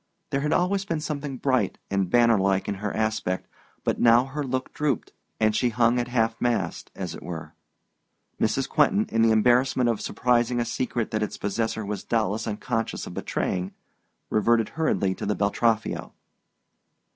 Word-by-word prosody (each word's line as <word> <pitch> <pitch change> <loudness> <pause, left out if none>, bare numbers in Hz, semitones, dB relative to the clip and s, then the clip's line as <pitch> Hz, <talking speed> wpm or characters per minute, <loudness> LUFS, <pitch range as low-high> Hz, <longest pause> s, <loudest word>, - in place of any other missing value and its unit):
There 140 - 0
had 150 +1 0
always 190 +2 +2
been 165 -5 -2
something 145 -3 -4
bright 130 -7 +1
and 100 -2 +1
bannerlike 100 -4 +3
in 105 - 0
her 105 -1 -1
aspect, 110 -4 -1 0.4
but - - 0
now 120 +1 +6
her 145 +2 -4
look 130 -1 -3
drooped, 145 -6 -1 0.3
and 110 -1 +3
she 125 - +2
hung 120 +1 +3
at 120 - -1
half 115 -2 0
mast, 120 -1 -1
as 90 -3 -4
it - - -9
were. 80 -3 -7 0.9
Mrs. 125 +5 +1
Quentin, 200 +8 +3
in 115 - +1
the 115 - +5
embarrassment 120 +3 +3
of 110 - -4
surprising 120 0 +1
a 120 - 0
secret 120 -1 -2
that 110 - -1
its 105 - -3
possessor 110 +1 -2
was 100 -1 -4
doubtless 110 -2 0
unconscious 115 +2 -2
of - - -8
betraying, 90 +1 -2 0.6
reverted 115 +1 +3
hurriedly 155 -12 0
to - - -6
the 105 - +1
Beltraffio. 110 +2 0
115 Hz, 165 wpm, -25 LUFS, 105-130 Hz, 0.9 s, now